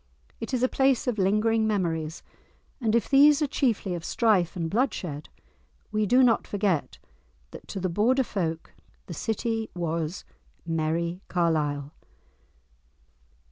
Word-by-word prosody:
It - - -5
is 255 -1 0
a - - +5
place 265 -1 +2
of 245 -5 -1
lingering 215 +3 +2
memories, 165 -6 -2 0.6
and 225 -3 +1
if 235 - +1
these 285 +1 +6
are - - +3
chiefly 240 -9 0
of 170 -2 -5
strife 200 -4 +2
and 170 -2 -2
bloodshed 180 - -2 0.6
we 215 0 0
do 255 +5 +5
not 235 -3 +3
forget 195 -7 -1 0.5
that - - -11
to 195 - -5
the 185 - -1
Border 230 +9 +2
folk 165 -8 -4 0.3
the 175 - -7
city 225 +5 -2
was 165 0 -3 0.4
"Merrie 165 +2 -1
Carlisle." 150 -5 0
195 Hz, 135 wpm, -26 LUFS, 165-230 Hz, 0.6 s, these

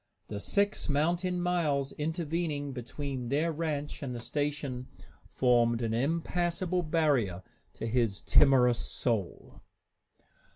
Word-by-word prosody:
The 105 - -4
six 200 - +1
mountain 175 +5 +1
miles 155 -6 0
intervening 155 -2 -2
between 130 0 -5
their 155 +5 +1
ranch 150 -2 -3
and 130 -3 -4
the - - -4
station 140 -1 -3 0.4
formed 120 -2 +2
an 110 -1 -1
impassable 170 +6 0
barrier 145 - +1 0.3
to - - -5
his 115 -5 +1
timorous 125 - +5
soul. 110 -8 -2
145 Hz, 110 wpm, -30 LUFS, 125-165 Hz, 0.4 s, timorous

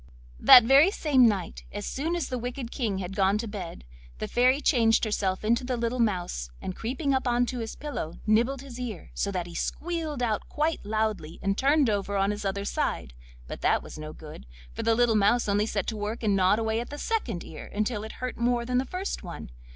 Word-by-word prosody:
That 245 - +10
very 275 +8 +6
same 280 - +4
night, 195 -5 -2
as 205 0 -5
soon 320 +6 -2
as 340 -5 -2
the 255 - -2
wicked 245 0 -5
King 220 -8 -1
had 190 0 -5
gone 195 0 +3
to 230 +2 -4
bed, 190 - -7 0.3
the - - -4
Fairy 255 +3 +3
changed 230 -6 +3
herself 200 -2 -1
into 235 +3 +2
the 250 0 -2
little 235 +2 -1
mouse, 180 - -1
and 185 - -5
creeping 270 +5 -1
up 265 -1 0
on 245 0 +2
to 250 0 -4
his 225 -1 -5
pillow 285 - -5
nibbled 240 +5 +2
his 255 -3 -9
ear, 230 -8 -6
so 200 - -1
that 180 -3 -2
he 170 - -10
squealed 315 - -3
out 220 -3 -1
quite 310 +2 -1
loudly 215 -6 -2
and 195 0 +1
turned 280 +3 +3
over 200 -1 -1
on 195 +1 +2
his 210 0 -5
other 200 +1 -2
side; 60 - -2 0.3
but - - -7
that - - +2
was - - -10
no 155 0 -6
good, 155 - -11 0.3
for - - -4
the 230 - +2
little 240 -1 +3
mouse 215 +4 +3
only 205 +1 +1
set 200 -4 -1
to 220 - -3
work 215 +3 -4
and 205 -2 +2
gnawed 190 +2 +4
away 220 0 0
at 240 - -5
the 290 - -7
second 265 - -2
ear 155 - -10
until 210 +1 -1
it 220 - -7
hurt 255 0 -5
more 240 0 +1
than 250 +1 +1
the 260 - -1
first 365 +7 -4
one. 170 - -8
225 Hz, 225 wpm, -27 LUFS, 200-255 Hz, 0.3 s, That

